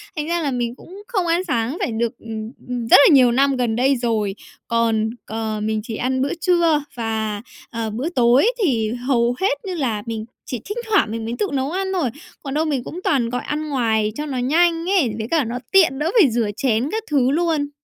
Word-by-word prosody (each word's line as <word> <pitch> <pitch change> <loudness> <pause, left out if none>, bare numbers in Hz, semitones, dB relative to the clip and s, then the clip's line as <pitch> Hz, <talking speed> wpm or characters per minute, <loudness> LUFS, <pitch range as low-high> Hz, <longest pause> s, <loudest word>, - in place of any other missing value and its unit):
Thành 305 0 -3
ra 340 0 0
là 285 -3 -1
mình 240 -1 -2
cũng 380 +9 -13
không 385 -8 -1
ăn 340 +2 +1
sáng 250 -1 -1
phải - - -1
được, 235 +1 -2
ừm, 220 0 -6 0.2
ừm, 245 -2 -3
rất - - +9
là 315 - +6
nhiều 250 -3 +6
năm 275 +2 +3
gần 235 -3 0
đây 265 +3 +3
rồi. 220 -5 -1 0.3
Còn, 225 -1 +1 0.2
ờ, 220 -1 -3
mình 215 0 0
chỉ 225 -1 -5
ăn 260 +2 -1
bữa 280 - 0
trưa 335 -5 +3
và, 220 -3 -2 0.3
ờ, 230 -2 -3
bữa 250 +10 -3
tối 255 - +4
thì 225 - +1 0.2
hầu 240 -2 +2
hết 380 -7 +2
như 370 - -3
là 235 -10 -1
mình 225 -1 -4 0.2
chỉ 250 - -4
thỉnh 415 +3 -5
thoảng 395 - +3
mình 225 0 -4
mới 230 - -3
tự 415 - +1
nấu 270 +2 -1
ăn 380 +1 -2
thôi. 320 -10 0 0.3
Còn 275 - -5
đâu 310 +2 +1
mình 275 -5 -1
cũng 350 - -7
toàn 245 -6 +1
gọi 245 0 -2
ăn 305 +1 -3
ngoài 220 -6 +1
cho 300 - -3
nó 275 -4 -4
nhanh 330 +6 +2
ấy, 280 - +2
với 220 0 -4
cả 320 -4 +3
nó 240 +2 -4
tiện 325 -9 +4
đỡ 325 +4 0
phải 280 - +5
rửa 225 -2 0
chén 245 +2 +1
các 445 0 -2
thứ 265 -2 +3
luôn. 315 -3 0
255 Hz, 230 wpm, -21 LUFS, 230-315 Hz, 0.3 s, rất